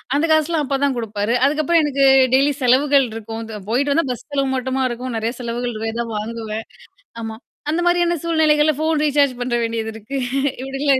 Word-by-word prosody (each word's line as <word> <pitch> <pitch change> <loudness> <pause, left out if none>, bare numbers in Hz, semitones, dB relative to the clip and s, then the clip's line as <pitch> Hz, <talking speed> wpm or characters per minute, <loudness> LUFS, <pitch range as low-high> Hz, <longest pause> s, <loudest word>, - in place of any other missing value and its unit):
அந்த 295 - +2
காசுலாம் 315 0 +2
அப்ப 275 0 -1
தான் 275 -2 +2
குடுப்பாரு. 215 -1 -2
அதுக்கப்புறம் 310 +3 +2
எனக்கு 280 -2 +1 0.3
டெய்லி 275 +2 +4
செலவுகள் 270 +2 +4
இருக்கும். 225 0 -6 0.3
போயிட்டு 280 +5 +1
வந்தா 330 -3 +1
பஸ் 245 - -7
செலவு 275 -1 0
மட்டுமா 260 +1 -1
இருக்கும். 245 +1 -5
நெறைய 225 +2 -2
செலவுகள் 240 0 -3
இரு 225 +1 -3
எதா 235 0 -2
வாங்குவேன் 220 0 -5 0.6
ஆமா. 220 -1 -6 0.3
அந்த 340 +3 0
மாதிரியான 350 0 +2
சூழ்நிலைகள்ல 310 -2 +3
ஃபோன் 315 0 +1
ரீசார்ஜ் 285 -2 +3
பண்ற 245 0 -1
வேண்டியது 225 -1 -2
இருக்கு. 225 +6 -8 0.5
இப்டிலாம் 270 0 +1
265 Hz, 170 wpm, -20 LUFS, 230-295 Hz, 0.6 s, டெய்லி